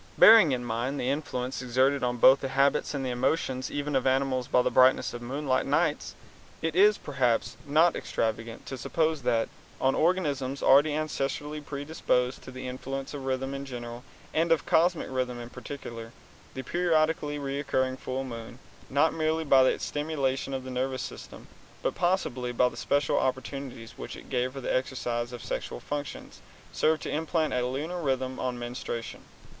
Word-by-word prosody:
Bearing 220 -9 +9
in 125 -2 -1
mind 120 +4 -2
the 125 - 0
influence 130 -3 -3
exerted 130 +3 +2
on 125 0 0
both 130 +3 +7
the 135 - -2
habits 140 +2 +2
and 135 -1 -2
the 125 - -1
emotions 130 +1 0
even 145 0 -2
of 130 0 +2
animals 130 -1 +1
by 125 - +3
the - - +1
brightness 130 0 +4
of 120 - -6
moonlight 135 +2 -1
nights, - - 0 0.4
it 160 0 -2
is 205 +3 +6
perhaps 130 -5 0
not 160 +4 +4
extravagant 115 +1 -3
to 135 - -6
suppose 160 +2 0
that, 115 -2 +1 0.3
on 135 0 +3
organisms 145 -6 0
already 140 +3 +6
ancestrally 150 0 -2
predisposed 140 -3 -1
to - - -11
the 130 0 -7
influence 135 +2 -5
of 140 -2 -6
rhythm 135 +1 -2
in 140 0 -4
general 120 -2 -7 0.3
and 165 +1 +1
of 165 - +3
cosmic 170 +1 +3
rhythm 125 -2 -2
in 120 0 -8
particular, 115 -3 -8 0.4
the 130 - -4
periodically 155 -2 +1
recurring 135 -2 -1
full 130 0 -4
moon, 115 -2 -8 0.3
not 145 +4 +3
merely 160 0 0
by 135 -3 +6
its - - 0
stimulation 140 -3 -1
of 135 -1 -3
the 130 - -7
nervous 130 +1 -2
system, - - -9 0.4
but - - 0
possibly 130 -9 0
by 125 +1 +3
the - - -6
special 145 -1 +1
opportunities 130 -2 -4
which - - -6
it - - -13
gave 125 0 0
for 135 - -6
the - - -1
exercise 120 -2 -2
of 120 -2 -7
the - - -10
sexual - - -4
functions, 145 0 -6 0.3
served 155 0 +2
to - - -4
implant 160 0 0
a 125 - +1
lunar 150 +8 -3
rhythm 130 -3 -1
on 125 -1 -2
menstruation. 120 -1 -5
135 Hz, 175 wpm, -28 LUFS, 125-145 Hz, 0.4 s, Bearing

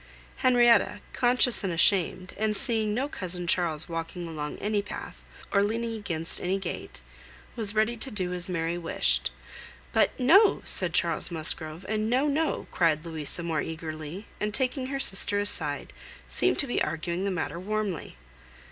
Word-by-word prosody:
Henrietta, 240 -2 +4
conscious 245 -2 +4
and 190 - -1
ashamed, 185 +1 +2
and 215 -1 0
seeing 220 -3 0
no 255 +6 -1
cousin 180 -9 -4
Charles 170 -3 0
walking 165 +1 -5
along 150 -2 -5
any 210 0 0
path, 200 - -8 0.3
or 200 - +3
leaning 230 +3 -1
against 170 -7 -3
any 185 +2 0
gate, 185 - -6 0.5
was 220 -3 +1
ready 220 +2 +2
to 250 +4 -4
do 185 -6 -2
as 180 +1 -3
Mary 170 -1 -1
wished; 165 - 0 0.6
but - - +2
"No!" 385 - +5
said - - +6
Charles - - +1
Musgrove, 160 +1 -2
and 215 +1 -1
"No, 255 +4 +2
no!" 310 +2 0
cried 165 -2 +1
Louisa 160 +1 -4
more 165 -2 -1
eagerly, 160 +3 -6
and 210 0 -2
taking 260 0 -1
her 275 0 -3
sister 205 -3 +2
aside, 155 -8 -1 0.3
seemed - - +2
to - - +1
be 245 - -1
arguing 170 +3 -2
the 200 - 0
matter 170 -3 -3
warmly. 205 - -3
195 Hz, 155 wpm, -27 LUFS, 165-225 Hz, 0.6 s, said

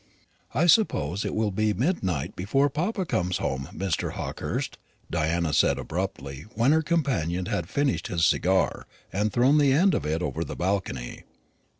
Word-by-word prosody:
"I 150 +7 +3
suppose 100 - +3
it - - -3
will 110 -1 +1
be 105 +1 +1
midnight 95 - -1
before 135 +10 +1
papa 185 +6 -1
comes 90 - 0
home, 65 0 -3
Mr. 95 -5 -2
Hawkehurst," - - -4 0.3
Diana 85 0 0
said - - +3
abruptly, 70 +4 -4
when 115 +5 +3
her 160 +1 +4
companion 120 - 0
had 85 -1 -2
finished 140 -2 0
his 85 -2 +1
cigar, 95 +2 +1 0.3
and 105 +2 +1
had 105 - -1
thrown 130 +5 +4
the 140 -2 +4
end 180 +8 +4
of - - 0
it 80 +3 -1
over 80 -2 -2
the - - -6
balcony. 90 -10 -2
95 Hz, 165 wpm, -26 LUFS, 85-140 Hz, 0.3 s, her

